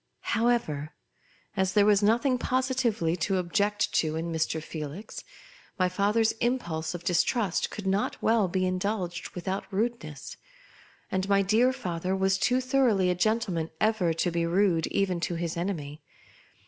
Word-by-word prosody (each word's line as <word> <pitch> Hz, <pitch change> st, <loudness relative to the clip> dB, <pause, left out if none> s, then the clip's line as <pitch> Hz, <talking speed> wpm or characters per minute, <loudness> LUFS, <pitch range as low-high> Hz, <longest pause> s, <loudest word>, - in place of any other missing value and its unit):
However, 220 Hz, -11 st, 0 dB, 0.6 s
as 190 Hz, -1 st, +1 dB
there 205 Hz, -1 st, +5 dB
was 205 Hz, -1 st, +4 dB
nothing 240 Hz, +5 st, +2 dB
positively 255 Hz, -11 st, 0 dB
to 195 Hz, +2 st, 0 dB
object 205 Hz, +4 st, 0 dB
to 155 Hz, -1 st, +1 dB
in 165 Hz, +1 st, -3 dB
Mr. 160 Hz, 0 st, -1 dB
Felix, 155 Hz, +5 st, -7 dB, 0.5 s
my 185 Hz, -2 st, +2 dB
father's 210 Hz, +4 st, +2 dB
impulse 175 Hz, -10 st, -1 dB
of 175 Hz, -, -7 dB
distrust 185 Hz, +2 st, +1 dB
could 210 Hz, -, -7 dB
not 195 Hz, +2 st, 0 dB
well 220 Hz, -3 st, +3 dB
be 185 Hz, +1 st, 0 dB
indulged 185 Hz, -1 st, -2 dB
without 190 Hz, +3 st, -4 dB
rudeness; 195 Hz, -, -3 dB, 0.7 s
and 190 Hz, +1 st, -1 dB
my 200 Hz, 0 st, +4 dB
dear 225 Hz, +6 st, +3 dB
father 185 Hz, -7 st, -3 dB
Avas 190 Hz, 0 st, +1 dB
too 250 Hz, +1 st, +2 dB
thor 260 Hz, 0 st, +3 dB
oughly 190 Hz, -4 st, +2 dB
a -, -, +2 dB
gentleman 180 Hz, -4 st, 0 dB
ever 215 Hz, -6 st, +2 dB
to 165 Hz, +2 st, 0 dB
be 170 Hz, 0 st, 0 dB
rude 170 Hz, -1 st, +2 dB
even 190 Hz, -3 st, 0 dB
to 170 Hz, 0 st, -2 dB
his 170 Hz, -1 st, -3 dB
enemy. 160 Hz, -5 st, -4 dB
190 Hz, 150 wpm, -28 LUFS, 170-220 Hz, 0.7 s, there